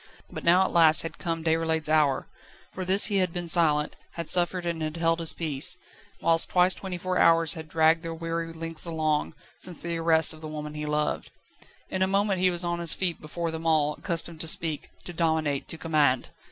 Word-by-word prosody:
But -, -, -8 dB
now 180 Hz, +3 st, +4 dB
at -, -, -3 dB
last 160 Hz, -2 st, +5 dB
had 165 Hz, 0 st, -8 dB
come 165 Hz, -1 st, -3 dB
Déroulède's 160 Hz, -1 st, 0 dB
hour. 150 Hz, -3 st, +1 dB, 0.4 s
For 185 Hz, -, -6 dB
this 190 Hz, +2 st, +5 dB
he 205 Hz, -2 st, 0 dB
had 185 Hz, -2 st, +1 dB
been 175 Hz, 0 st, -5 dB
silent, 155 Hz, -4 st, +2 dB, 0.2 s
had 170 Hz, -2 st, -1 dB
suffered 180 Hz, 0 st, +4 dB
and 170 Hz, -1 st, -3 dB
had 155 Hz, +1 st, -4 dB
held 165 Hz, 0 st, +1 dB
his 165 Hz, -1 st, +3 dB
peace, 155 Hz, +1 st, 0 dB, 0.5 s
whilst 165 Hz, 0 st, +5 dB
twice 180 Hz, +1 st, +3 dB
twenty 185 Hz, -1 st, -6 dB
four 185 Hz, +1 st, -2 dB
hours 165 Hz, -2 st, +4 dB
had 160 Hz, -1 st, -8 dB
dragged 160 Hz, +1 st, +2 dB
their 165 Hz, -1 st, -6 dB
weary 165 Hz, 0 st, -4 dB
lengths 165 Hz, 0 st, -6 dB
along, 155 Hz, -2 st, -2 dB, 0.2 s
since 180 Hz, -2 st, -1 dB
the 170 Hz, 0 st, -4 dB
arrest 165 Hz, -1 st, +2 dB
of 155 Hz, -, -14 dB
the 155 Hz, -, -7 dB
woman 150 Hz, -1 st, -7 dB
he 150 Hz, 0 st, -6 dB
loved. 150 Hz, 0 st, -2 dB, 0.6 s
In 185 Hz, -, -3 dB
a 190 Hz, -, +3 dB
moment 195 Hz, 0 st, +1 dB
he 185 Hz, -, +4 dB
was 175 Hz, 0 st, 0 dB
on 175 Hz, 0 st, -2 dB
his 170 Hz, -1 st, +1 dB
feet 180 Hz, -4 st, -1 dB
before 165 Hz, +2 st, -5 dB
them 160 Hz, 0 st, -5 dB
all, 150 Hz, -2 st, +2 dB
accustomed 165 Hz, 0 st, -3 dB
to 165 Hz, -, -1 dB
speak, 160 Hz, -2 st, +1 dB
to 175 Hz, -, -8 dB
dominate, 160 Hz, -4 st, -1 dB
to 160 Hz, -, -5 dB
command. 150 Hz, -6 st, 0 dB
165 Hz, 210 wpm, -26 LUFS, 155-175 Hz, 0.6 s, last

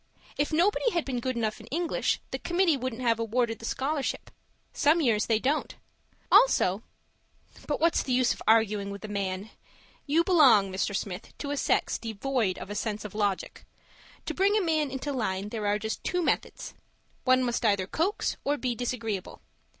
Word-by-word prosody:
If 290 Hz, -, -1 dB
nobody 385 Hz, +9 st, +2 dB
had 340 Hz, -2 st, 0 dB
been 255 Hz, -3 st, -2 dB
good 255 Hz, +1 st, -2 dB
enough 220 Hz, -2 st, -1 dB
in -, -, -13 dB
English, 335 Hz, +3 st, -1 dB
the -, -, -3 dB
committee 345 Hz, -2 st, +2 dB
wouldn't 255 Hz, -2 st, -4 dB
have 230 Hz, -2 st, +2 dB
awarded 230 Hz, 0 st, 0 dB
the 225 Hz, -, -8 dB
scholarship; 275 Hz, +4 st, -2 dB, 0.4 s
some 310 Hz, +3 st, +3 dB
years 225 Hz, -8 st, +2 dB
they 225 Hz, -, +3 dB
don't. 275 Hz, +7 st, -1 dB, 0.6 s
Also 205 Hz, -, +5 dB, 0.9 s
But 295 Hz, -, -1 dB
what's 335 Hz, 0 st, +3 dB
the 260 Hz, -, -4 dB
use 250 Hz, -1 st, +3 dB
of -, -, -13 dB
arguing 215 Hz, -2 st, +3 dB
with 200 Hz, +1 st, -7 dB
a -, -, -5 dB
man? 200 Hz, 0 st, -3 dB, 0.6 s
You 320 Hz, +4 st, +3 dB
belong, 265 Hz, -, +5 dB
Mr. 195 Hz, +2 st, -1 dB
Smith, 195 Hz, -1 st, -5 dB
to 285 Hz, -, -4 dB
a -, -, -1 dB
sex -, -, +1 dB
devoid 225 Hz, -2 st, -1 dB
of 200 Hz, -, -8 dB
a -, -, -4 dB
sense 210 Hz, 0 st, -3 dB
of 210 Hz, -, -7 dB
logic. 205 Hz, -3 st, -2 dB, 0.6 s
To -, -, -3 dB
bring 400 Hz, +3 st, +3 dB
a -, -, +2 dB
man 310 Hz, -4 st, +1 dB
into 265 Hz, +2 st, -4 dB
line, 200 Hz, -5 st, -2 dB
there 215 Hz, -2 st, -3 dB
are 205 Hz, 0 st, +2 dB
just 220 Hz, +1 st, -4 dB
two 360 Hz, -1 st, -1 dB
methods: -, -, -2 dB, 0.5 s
one 255 Hz, 0 st, +4 dB
must 240 Hz, 0 st, -1 dB
either 200 Hz, -4 st, +2 dB
coax 335 Hz, -, -1 dB
or 290 Hz, +1 st, 0 dB
be 255 Hz, -3 st, -1 dB
disagreeable. 230 Hz, -5 st, -4 dB
240 Hz, 180 wpm, -28 LUFS, 210-290 Hz, 0.9 s, Also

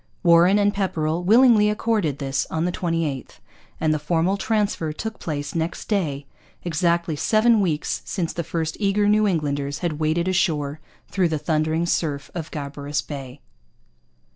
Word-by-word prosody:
Warren 175 Hz, +3 st, +6 dB
and 205 Hz, 0 st, +2 dB
Pepperrell 170 Hz, -4 st, -1 dB
willingly 220 Hz, +1 st, +5 dB
accorded 210 Hz, -, 0 dB
this 135 Hz, -1 st, -2 dB
on 160 Hz, +1 st, -1 dB
the 180 Hz, -, 0 dB
28th; 165 Hz, -7 st, -2 dB, 0.5 s
and 155 Hz, -1 st, +2 dB
the 155 Hz, -, -1 dB
formal 170 Hz, +5 st, +1 dB
transfer 205 Hz, -6 st, -1 dB
took 220 Hz, +7 st, -6 dB
place 145 Hz, -3 st, -4 dB
next 165 Hz, 0 st, -3 dB
day, 150 Hz, -10 st, -1 dB, 0.4 s
exactly 170 Hz, -1 st, 0 dB
seven 220 Hz, +7 st, +3 dB
weeks 160 Hz, -5 st, -1 dB
since 175 Hz, -5 st, -3 dB
the 170 Hz, -, -3 dB
first 160 Hz, 0 st, -3 dB
eager 205 Hz, 0 st, +2 dB
New 210 Hz, 0 st, +4 dB
Englanders 145 Hz, -5 st, -1 dB
had 155 Hz, -3 st, -2 dB
waded 160 Hz, +3 st, 0 dB
ashore 155 Hz, -5 st, 0 dB, 0.3 s
through 185 Hz, -3 st, +1 dB
the 155 Hz, -, -1 dB
thundering 155 Hz, +2 st, 0 dB
surf 150 Hz, -4 st, -2 dB
of 165 Hz, -3 st, -5 dB
Gabarus 145 Hz, 0 st, -4 dB
Bay. 135 Hz, -2 st, -8 dB
165 Hz, 150 wpm, -23 LUFS, 150-195 Hz, 0.5 s, Warren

